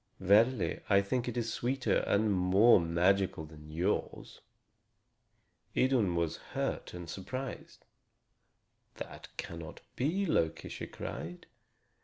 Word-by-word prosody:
Verily, 105 +4 +3
I 100 0 +5
think 120 +5 -1
it 120 0 -3
is 115 -1 -1
sweeter 125 +2 0
and 105 0 +3
more 95 +5 +6
magical 85 0 +1
than 75 -1 -13
yours." 85 +6 -2 1.4
Idun 120 -9 +3
was 85 -1 0
hurt - - -4
and 90 -1 -7
surprised. 125 +10 -6 1.1
"That - - -8
cannot 85 -2 -7
be, 170 +10 0
Loki," 80 - 0
she - - -6
cried. 90 +2 -7
100 Hz, 110 wpm, -32 LUFS, 85-120 Hz, 1.4 s, more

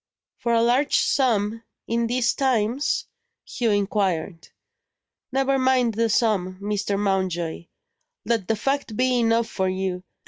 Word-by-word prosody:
"For 235 - 0
a 230 - +3
large 255 +5 +3
sum 225 -4 +1 0.2
in 230 0 0
these 245 0 +1
times?" 255 0 0 0.4
Hugh 235 -2 -1
inquired. 195 -4 -1 0.8
"Never 270 +1 +1
mind 255 -3 +2
the 230 +2 +1
sum, 200 -4 +1
Mr. 205 0 -2
Mountjoy 185 -4 -1 0.6
let 225 -6 0
the 225 - +1
fact 270 -1 -2
be 255 -1 +2
enough 230 0 +2
for 190 -4 -1
you. 185 -1 -2
225 Hz, 130 wpm, -24 LUFS, 195-245 Hz, 0.8 s, a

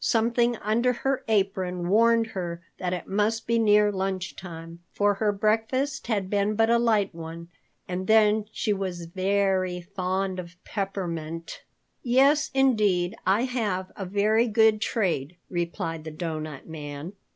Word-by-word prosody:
Something 235 +1 +2
under 235 +5 +1
her 270 +2 -1
apron 190 -4 0
warned 230 +3 +4
her 170 -2 -4 0.2
that 180 -1 -2
it 180 -1 -3
must 210 +3 0
be 230 0 +2
near 210 -1 +4
lunch 190 -2 -3
time, 165 -1 -9
for 205 0 +2
her 210 +1 +1
breakfast 225 +7 0
had 205 -5 0
been 205 +2 0
but 225 +1 +3
a 235 - +4
light 215 -4 +2
one, 165 +1 -8 0.4
and 185 +1 -4
then 215 -1 +4
she 215 - 0
was 185 -3 -4
very 185 0 0
fond 185 +1 -2
of 175 0 -8
peppermint. 170 -5 -4 0.4
"Yes, 275 +5 +3
indeed, 210 -8 +2
I 200 +5 +3
have 210 -8 -2
a 195 - -5
very 215 +4 +2
good 220 -1 +4
trade," 175 - -1 0.2
replied 170 -2 -3
the 160 - -6
Doughnut 155 -3 -5
Man. 150 +2 -7
195 Hz, 145 wpm, -26 LUFS, 175-220 Hz, 0.4 s, warned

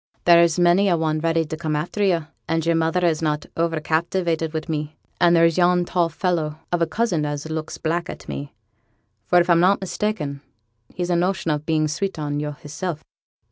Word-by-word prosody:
'There's 170 -2 +6
many 175 +3 +4
a 175 - +3
one 155 -1 0
ready 165 0 +1
to 155 - -5
come 155 -1 -2
after 170 +7 -3
yo'; 170 -5 +2 0.2
and 165 0 0
yo'r 170 - +3
mother 165 +2 +1
is 160 -2 +1
not 150 -2 -1
o'er 165 -1 0
captivated 165 0 -1
wi' 160 0 -2
me; 155 -1 -4 0.2
and 175 -1 +5
there's 165 +1 +4
yon 175 0 +3
tall 175 -1 +1
fellow 160 -3 -1
of 175 -1 0
a 165 - +3
cousin 175 -2 0
as 145 +1 -3
looks 155 -1 -4
black 170 +2 -2
at - - -9
me, 140 0 -6 0.8
for 180 - +5
if 175 - +2
I'm 170 -2 +5
not 185 +3 +4
mista'en 180 -7 -3 0.5
he's 180 -1 -3
a - - +3
notion 175 -1 0
of 150 0 -3
being 155 -1 +2
sweet 190 +5 -3
on 145 -1 -2
yo' 150 0 -3
hisself.' 150 +3 -6
165 Hz, 200 wpm, -22 LUFS, 155-175 Hz, 0.8 s, There's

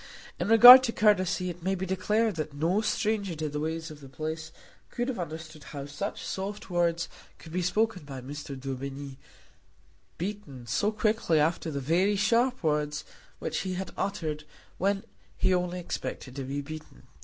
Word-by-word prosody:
In - - -1
regard 245 +4 +12
to 230 - -1
courtesy 185 -4 +2
it 175 +1 -12
may 190 +3 0
be 190 0 -3
declared 210 +4 +1
that 155 -2 -4
no 170 +8 +1
stranger 210 -4 0
to 155 0 -3
the 150 +1 -3
ways 160 +1 -3
of 150 - -11
the 135 - -11
place 155 +3 -5 0.4
could 240 0 -2
have 245 - -3
understood 160 -2 -7
how 140 -2 -7
such 145 +8 -5
soft 195 0 -5
words 170 -1 +1 0.3
could 160 - -13
be 180 +2 -1
spoken 210 0 0
by 140 -2 -7
Mr. 140 +1 -7
Daubeny, 135 +1 -6 1.0
beaten, 180 - -6
so 205 - +1
quickly 215 -6 +1
after 160 +2 +1
the 140 -2 -3
very 175 +9 +2
sharp 235 +4 +2
words 150 -1 0 0.3
which - - -3
he 185 -1 -3
had 190 +1 -4
uttered 160 -7 -3 0.4
when 195 +1 +1 0.3
he 185 - +2
only 180 0 -1
expected 135 -6 -5
to 135 -2 -4
be 140 +2 -3
beaten. 155 +2 -10
170 Hz, 170 wpm, -28 LUFS, 150-200 Hz, 1.0 s, regard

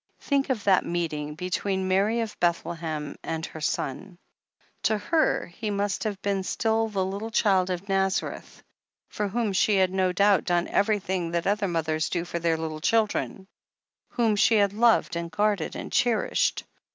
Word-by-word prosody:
"Think 280 -1 0
of 235 -6 -1
that 195 -2 +4
meeting 155 -4 -3
between 185 +2 -2
Mary 200 +5 +2
of 225 -2 -4
Bethlehem 165 -3 -2
and 160 0 -3
her 160 - -9
Son. 175 +6 -3 0.6
To 215 - +2
her 315 +9 +1
He 210 +5 -6
must 205 +1 -1
have 205 -3 -2
been 200 -1 0
still 225 +3 0
the 195 -3 -1
little 200 +4 -4
Child 195 -4 +2
of 180 +2 -4
Nazareth, 195 -1 -2 0.5
for 210 - -2
whom 220 0 -1
she 205 +2 +3
had 190 -1 +3
no 185 -1 +2
doubt 200 +1 +3
done 175 -1 +1
everjrthing 190 -4 0
that 170 -1 -1
other 205 0 +1
mothers 160 -2 -1
do 175 -1 -2
for 170 -1 -4
their 165 -1 +1
little 160 -1 -5
chil 225 +5 +3
dren 195 -2 -5 0.3
— - - -43
^whom 230 -5 +2
she 225 - +5
had 200 -2 +3
loved 230 -4 +3
and 170 0 -3
guarded 200 0 0
and - - -6
cherished. 240 -3 +1
190 Hz, 175 wpm, -26 LUFS, 170-210 Hz, 0.6 s, she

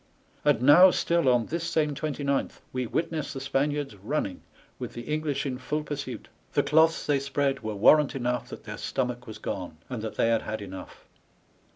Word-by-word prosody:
And - - +3
now 170 +7 +9
still 170 -5 +2
on 120 -2 +3
this 170 +6 -3
same 155 -3 +1
29th 140 -2 -2
we 130 -2 -1
witness 160 0 -2
the 135 - -5
Spaniards 140 -1 -1
running, 100 -1 -3 0.4
with - - -5
the 120 - -6
English 150 0 -2
in 130 -2 -3
full 150 +4 -2
pursuit. 145 -4 -5 0.3
The - - +3
cloths 160 +2 +3
they 145 -2 +2
spread 140 0 0
were 110 -1 -4
warrant 145 +8 +5
enough 125 -1 -2
that - - -9
their - - -7
stomach 125 -2 -2
was 110 - -7
gone, 90 -4 -5
and 120 -4 -3
that 110 -1 -5
they 115 - +2
had 115 -1 +2
had 110 +1 -4
enough. 95 -2 -9
135 Hz, 185 wpm, -27 LUFS, 120-150 Hz, 0.4 s, now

